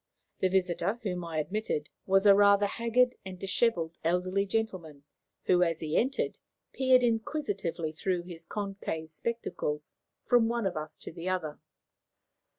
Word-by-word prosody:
The 190 Hz, -, +3 dB
visitor, 190 Hz, +4 st, 0 dB
whom 180 Hz, -4 st, -2 dB
I 165 Hz, -2 st, -4 dB
admitted, 155 Hz, -2 st, -2 dB, 0.2 s
was 195 Hz, +1 st, +4 dB
a 200 Hz, -, +9 dB
rather 200 Hz, 0 st, +5 dB
haggard 235 Hz, +4 st, +2 dB
and 190 Hz, -2 st, -7 dB
dishevelled 185 Hz, -3 st, 0 dB
elderly 185 Hz, +4 st, +1 dB
gentleman, 185 Hz, -10 st, -3 dB, 0.4 s
who, 180 Hz, -1 st, +3 dB
as 165 Hz, -2 st, +2 dB
he 155 Hz, -1 st, -3 dB
entered, 265 Hz, +3 st, 0 dB, 0.3 s
peered 260 Hz, -1 st, +4 dB
inquisitively 220 Hz, -, -1 dB
through 175 Hz, +2 st, -1 dB
his 175 Hz, -2 st, -10 dB
concave 195 Hz, -4 st, -4 dB
spectacles 150 Hz, -6 st, -3 dB, 0.3 s
from 240 Hz, -2 st, +4 dB
one 235 Hz, -1 st, -1 dB
of 190 Hz, -, -1 dB
us 155 Hz, 0 st, -5 dB
to -, -, -8 dB
the 170 Hz, +2 st, -5 dB
other. 160 Hz, -5 st, -2 dB
190 Hz, 145 wpm, -30 LUFS, 165-220 Hz, 0.4 s, a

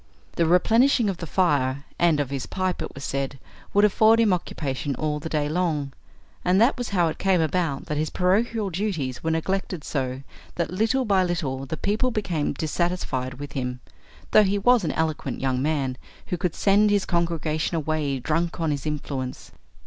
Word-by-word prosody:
The 170 Hz, -, +2 dB
replenishing 225 Hz, +6 st, +4 dB
of 185 Hz, -, -7 dB
the 165 Hz, -, -6 dB
fire 140 Hz, -6 st, +1 dB, 0.2 s
and 165 Hz, -3 st, +4 dB
of 140 Hz, -2 st, -1 dB
his 135 Hz, -3 st, -3 dB
pipe, 185 Hz, -1 st, -2 dB
it -, -, -4 dB
was 140 Hz, -, -8 dB
said, 140 Hz, 0 st, -2 dB, 0.3 s
would 205 Hz, +1 st, +5 dB
afford 220 Hz, +2 st, +5 dB
him 220 Hz, -4 st, +4 dB
occupation 145 Hz, -5 st, -3 dB
all 150 Hz, +2 st, -2 dB
the 160 Hz, +2 st, -6 dB
day 150 Hz, -2 st, 0 dB
long, 155 Hz, -4 st, -1 dB, 0.5 s
and 180 Hz, +2 st, +3 dB
that 235 Hz, +5 st, +4 dB
was 245 Hz, -2 st, -4 dB
how 180 Hz, -4 st, +2 dB
it 155 Hz, -, -6 dB
came 190 Hz, -2 st, +3 dB
about 160 Hz, -2 st, 0 dB
that 150 Hz, -3 st, -2 dB
his 155 Hz, 0 st, 0 dB
parochial 205 Hz, +3 st, +1 dB
duties 165 Hz, -10 st, -2 dB
were 160 Hz, -, 0 dB
neglected 175 Hz, 0 st, -2 dB
so 130 Hz, -2 st, -3 dB, 0.3 s
that, 170 Hz, -1 st, -2 dB
little 225 Hz, +7 st, +1 dB
by 195 Hz, -3 st, +3 dB
little, 140 Hz, -7 st, -2 dB
the 160 Hz, -, -4 dB
people 215 Hz, +9 st, 0 dB
became 185 Hz, -12 st, -1 dB
dissatisfied 155 Hz, -5 st, -2 dB
with 145 Hz, +2 st, -8 dB
him, 125 Hz, -3 st, -3 dB, 0.5 s
though 215 Hz, -, +7 dB
he 200 Hz, 0 st, +2 dB
was 245 Hz, +2 st, +4 dB
an 160 Hz, -, 0 dB
eloquent 160 Hz, -1 st, -2 dB
young 130 Hz, -1 st, 0 dB
man, 135 Hz, -4 st, -1 dB, 0.3 s
who -, -, -2 dB
could 180 Hz, -2 st, -2 dB
send 205 Hz, +1 st, +4 dB
his 205 Hz, -2 st, +2 dB
congregation 165 Hz, -2 st, -1 dB
away 155 Hz, -3 st, -1 dB
drunk 165 Hz, +7 st, -1 dB
on 165 Hz, -2 st, +1 dB
his 145 Hz, 0 st, -3 dB
influence. 140 Hz, -4 st, -4 dB
165 Hz, 185 wpm, -25 LUFS, 145-190 Hz, 0.5 s, though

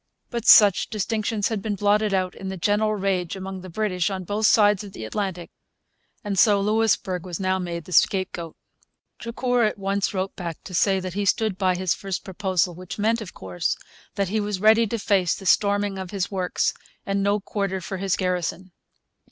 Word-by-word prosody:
But 235 Hz, -2 st, -4 dB
such 205 Hz, -4 st, +7 dB
distinctions 215 Hz, 0 st, -1 dB
had 220 Hz, -3 st, -2 dB
been 210 Hz, 0 st, -2 dB
blotted 210 Hz, +1 st, +2 dB
out 185 Hz, -1 st, 0 dB
in 190 Hz, -, -8 dB
the 190 Hz, -, -5 dB
general 210 Hz, +4 st, +1 dB
rage 190 Hz, -3 st, -1 dB
among 190 Hz, 0 st, -6 dB
the 185 Hz, -, -9 dB
British 185 Hz, -1 st, -1 dB
on 190 Hz, -1 st, -4 dB
both 205 Hz, +4 st, +1 dB
sides 210 Hz, -3 st, +4 dB
of 200 Hz, -2 st, -10 dB
the 110 Hz, -, -7 dB
Atlantic; 180 Hz, -, -4 dB, 0.7 s
and 200 Hz, -3 st, -1 dB
so 205 Hz, -2 st, +5 dB
Louisbourg 205 Hz, -4 st, +1 dB
was 175 Hz, -3 st, -6 dB
now 190 Hz, 0 st, 0 dB
made 170 Hz, -3 st, -5 dB
the -, -, -12 dB
scapegoat. 175 Hz, -2 st, +1 dB, 0.6 s
Drucour 245 Hz, +1 st, 0 dB
at 215 Hz, -, 0 dB
once 195 Hz, 0 st, -1 dB
wrote 190 Hz, -1 st, -3 dB
back 170 Hz, -3 st, -5 dB
to 185 Hz, -, -10 dB
say 190 Hz, +2 st, +2 dB
that 185 Hz, -1 st, -5 dB
he 205 Hz, +2 st, -1 dB
stood 215 Hz, 0 st, +1 dB
by 185 Hz, -1 st, +1 dB
his 185 Hz, -1 st, 0 dB
first 195 Hz, -2 st, -5 dB
proposal, 185 Hz, -2 st, -1 dB
which 180 Hz, +1 st, -8 dB
meant, 225 Hz, +2 st, +1 dB
of 200 Hz, -, -9 dB
course, 90 Hz, -2 st, -2 dB, 0.4 s
that 200 Hz, -2 st, -1 dB
he 215 Hz, +2 st, 0 dB
was 205 Hz, -2 st, -2 dB
ready 220 Hz, +2 st, +5 dB
to 230 Hz, -, -2 dB
face 195 Hz, -4 st, +1 dB
the 195 Hz, -, -10 dB
storming 200 Hz, +1 st, +2 dB
of 190 Hz, -1 st, -6 dB
his 195 Hz, -1 st, -3 dB
works 185 Hz, -2 st, 0 dB, 0.3 s
and 200 Hz, 0 st, 0 dB
no 200 Hz, +1 st, +2 dB
quarter 195 Hz, -1 st, -3 dB
for 190 Hz, +2 st, -5 dB
his 195 Hz, 0 st, 0 dB
garrison. 180 Hz, 0 st, -2 dB
195 Hz, 195 wpm, -24 LUFS, 185-210 Hz, 0.7 s, such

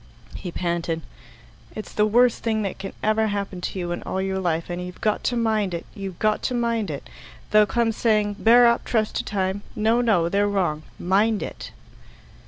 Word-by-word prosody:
He 180 Hz, -, -6 dB
panted, 170 Hz, -2 st, -2 dB, 0.7 s
"It's 215 Hz, -, -7 dB
the 210 Hz, 0 st, +3 dB
worst 240 Hz, +2 st, +3 dB
thing 220 Hz, -2 st, 0 dB
that 195 Hz, -1 st, -4 dB
can 195 Hz, 0 st, -6 dB
ever 215 Hz, +1 st, +2 dB
happen 200 Hz, -3 st, -3 dB
to 185 Hz, -, -4 dB
you 175 Hz, -1 st, -3 dB
in 175 Hz, -, -3 dB
all 190 Hz, -, -3 dB
your 190 Hz, 0 st, -1 dB
life, 170 Hz, -3 st, -1 dB
and 175 Hz, +1 st, -3 dB
you've 180 Hz, 0 st, -8 dB
got 215 Hz, -1 st, 0 dB
to 245 Hz, -, +1 dB
mind 215 Hz, -5 st, +1 dB
it 170 Hz, -, -6 dB
you've 195 Hz, -5 st, -6 dB
got 215 Hz, 0 st, +1 dB
to 250 Hz, -, -1 dB
mind 230 Hz, -4 st, 0 dB
it. 145 Hz, -2 st, -6 dB, 0.4 s
They'll 210 Hz, 0 st, +6 dB
come 235 Hz, 0 st, +1 dB
saying, 210 Hz, -2 st, +1 dB
'Bear 240 Hz, +2 st, +7 dB
up 235 Hz, 0 st, +3 dB
trust 220 Hz, -3 st, 0 dB
to -, -, -1 dB
time.' 195 Hz, -1 st, -2 dB
No, 225 Hz, +3 st, +2 dB
no; 200 Hz, -8 st, +3 dB
they're 200 Hz, +3 st, +2 dB
wrong. 175 Hz, -7 st, 0 dB, 0.2 s
Mind 205 Hz, +4 st, +2 dB
it." -, -, -7 dB
205 Hz, 195 wpm, -24 LUFS, 180-220 Hz, 0.7 s, Bear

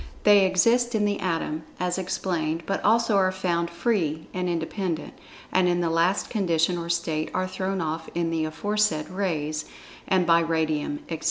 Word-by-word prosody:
They 205 Hz, -2 st, +6 dB
exist 235 Hz, +6 st, +3 dB
in 210 Hz, -1 st, +2 dB
the 205 Hz, -1 st, 0 dB
Atom, 165 Hz, -3 st, -2 dB, 0.2 s
as 180 Hz, +1 st, -1 dB
explained, 170 Hz, -3 st, -2 dB
but 195 Hz, -, -2 dB
also 225 Hz, -1 st, +3 dB
are 185 Hz, -1 st, +3 dB
found 175 Hz, -2 st, -1 dB
"free" 170 Hz, -4 st, -1 dB
and 180 Hz, -1 st, -1 dB
independent, 170 Hz, 0 st, -3 dB, 0.4 s
and 185 Hz, -1 st, +3 dB
in 175 Hz, 0 st, +1 dB
the 170 Hz, -2 st, 0 dB
last 170 Hz, +4 st, +2 dB
condition 175 Hz, -5 st, +1 dB
or 170 Hz, -1 st, -5 dB
state 165 Hz, -2 st, -1 dB
are 185 Hz, -, 0 dB
thrown 190 Hz, 0 st, -2 dB
off 160 Hz, 0 st, -3 dB
in 170 Hz, -1 st, 0 dB
the 160 Hz, -1 st, 0 dB
aforesaid 185 Hz, -1 st, 0 dB
"Rays," 155 Hz, -5 st, -2 dB, 0.4 s
and 185 Hz, -2 st, +3 dB
by 170 Hz, 0 st, +5 dB
Radium, 160 Hz, -3 st, -1 dB
etc. 165 Hz, -2 st, -4 dB
175 Hz, 170 wpm, -25 LUFS, 160-190 Hz, 0.4 s, They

